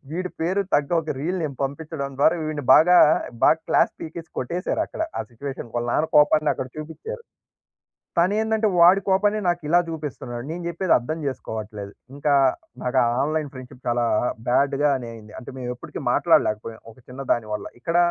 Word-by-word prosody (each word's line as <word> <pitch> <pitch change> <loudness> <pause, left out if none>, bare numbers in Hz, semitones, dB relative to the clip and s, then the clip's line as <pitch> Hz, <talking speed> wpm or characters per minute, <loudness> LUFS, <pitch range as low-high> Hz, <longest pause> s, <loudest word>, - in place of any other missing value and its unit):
వీడి 180 +2 -3
పేరు 185 +5 +1
తగ్గ 145 -1 +2
ఒక 160 -2 -4
రీల్ 175 +7 -2
నేను 145 -4 -4
పంపించడం 140 0 -4
ద్వారా 160 +4 +4
వీడిని 155 -2 -4
బాగా, 180 +3 +6 0.5
బాగా 160 - +5
క్లాస్ - - +3
పీకేసి 165 +1 -7
కొట్టేసారు 175 - -2
అక్కడ. - - -9 0.2
ఆ - - 0
సిట్యుయేషన్, 130 +1 -7
వాళ్ళ 120 0 -1
నాన్న 155 - +2
కోపాన్ని 150 0 +5
అక్కడ 130 - -5
చూపించారు. 430 - -7 1.0
తను 180 +4 +3
ఏందంటే, 220 0 +1
వాడి 180 +3 +7
కోపాన్ని 205 +2 +2
నాకు 175 0 -1
ఇలా 175 - +5
చూపిస్తున్నాడు. 135 -6 -6
నేను 175 +1 -5
జెప్పేది 170 +1 +2
అర్థం 155 +7 -4
చేసుకోవట్లేదు. 105 -5 -6 0.2
ఇంకా 145 0 +1 0.5
నాకు 125 - +1 0.2
ఆన్లైన్ 155 0 -1
ఫ్రెండ్షిప్ 130 0 -12
చాలా 120 0 +1 0.4
బాడ్‌ 140 +2 +2
గానే 130 -5 +1
అయింది. 110 -2 -13
అంటే 125 - -10
మేము 125 -1 -4
ఎప్పటికీ 125 - -8
మాట్లాడలేకపోయాం. 110 +1 +1
ఒక 110 - -20
చిన్న 130 +2 -8
దాని 110 -2 -5
వల్ల. 105 - -4 0.2
ఇక్కడ 165 +4 0
150 Hz, 165 wpm, -23 LUFS, 125-170 Hz, 1.0 s, వాడి